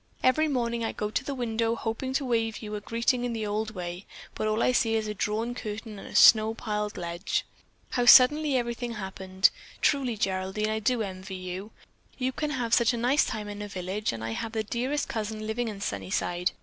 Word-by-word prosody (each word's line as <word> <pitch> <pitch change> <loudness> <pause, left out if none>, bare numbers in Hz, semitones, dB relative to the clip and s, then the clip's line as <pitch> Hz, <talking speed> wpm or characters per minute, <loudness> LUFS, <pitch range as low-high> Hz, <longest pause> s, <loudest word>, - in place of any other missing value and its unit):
Every 310 +5 +4
morning 235 -4 -1
I 225 - -2
go 210 0 -3
to 235 - -1
the 280 0 -4
window 230 -2 0
hoping 230 +3 -3
to 270 +1 0
wave 225 -2 -1
you 210 0 -6
a 210 - -3
greeting 235 +3 0
in 245 -1 -1
the 220 -2 -2
old 215 +1 -2
way, 175 +1 -6 0.3
but 215 - -2
all 215 +1 +1
I - - +4
see 225 -2 +2
is 220 -1 0
a 210 - -2
drawn 215 +4 -1
curtain 215 -2 -6
and - - -9
a - - -10
snow 220 0 +7
piled 210 -2 -3
ledge. 170 +1 -2 0.5
How 245 -1 +1
suddenly 275 +3 +7
everything 240 0 -2
happened! 190 -2 +1 0.3
Truly, 260 -6 +1
Geraldine, 190 +2 -1
I 220 - -1
do 230 +1 +1
envy 190 -1 -6
you. 185 +2 -6 0.5
One 255 0 0
can 300 +3 -2
have 245 -5 -2
such 235 0 +5
a - - -3
nice 250 +6 +3
time 215 -1 -4
in 205 0 -6
a 205 - -4
village 190 +2 -3
and 115 -1 -6
I 115 - -3
have 220 - -4
the 220 -1 0
dearest 255 +7 -2
cousin 215 -1 -4
living 225 +2 -2
in 205 -2 -6
Sunnyside. 175 - -1
220 Hz, 215 wpm, -28 LUFS, 205-240 Hz, 0.5 s, snow